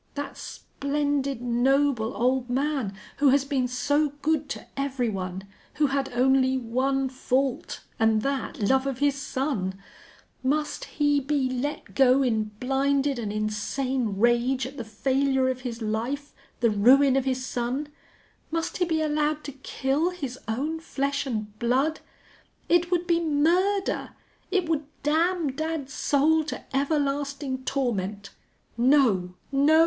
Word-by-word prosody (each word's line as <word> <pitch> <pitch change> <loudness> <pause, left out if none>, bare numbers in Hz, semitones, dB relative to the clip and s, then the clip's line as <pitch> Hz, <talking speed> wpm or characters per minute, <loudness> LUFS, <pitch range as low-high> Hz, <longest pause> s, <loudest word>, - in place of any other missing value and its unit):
That 285 -1 -5
splendid, 280 -2 -2
noble 245 -1 +2
old 250 +1 +1
man, 265 -5 -1 0.2
who 285 0 +5
has 275 +1 +3
been 270 -3 0
so 285 +4 +1
good 310 -2 +1
to - - -5
every 270 -3 -1
one 190 -2 -4 0.3
who 300 - +3
had 275 -1 -1
only 260 +1 +3
one 260 +3 0
fault, 260 0 -1 0.2
and 220 -1 +3
that 275 +1 -2
love 265 +2 +3
of 270 -3 -2
his 285 +1 +2
son 265 -8 -2 0.7
must 295 +3 -1
he 290 -1 +1
be 280 -1 0
let 265 +4 -4
go 265 0 +5
in 220 -4 +1
blinded 275 +1 +1
and 215 -3 -3
insane 215 +2 -1
rage 240 +3 +2
at 265 +2 -7
the 240 - -4
failure 265 +4 +1
of 255 0 -3
his 235 -2 -5
life, 240 +7 -3 0.3
the 235 -2 +4
ruin 260 +6 +5
of 270 -1 +1
his 260 -1 -1
son 250 +4 -2 0.6
must 330 +1 -2
he 360 - +2
be 320 -2 0
allowed 300 0 0
to 285 - -6
kill 275 +4 -1
his 275 -8 -6
own 290 +9 -2
flesh 280 -3 -2
and 215 -4 -4
blood?... 265 +7 +1 0.7
It 345 0 +3
would 355 -1 +1
be 340 -1 +2
murder! 350 +6 +1 0.3
It 375 -3 +1
would 310 -3 0 0.2
damn 325 +1 +2
dad's 310 -1 -4
soul 310 +3 +3
to 300 - -5
everlasting 280 -2 -1
torment. 205 -7 -2 0.4
No! 235 -8 +3 0.2
No! 285 +3 +5
270 Hz, 140 wpm, -26 LUFS, 245-290 Hz, 0.7 s, who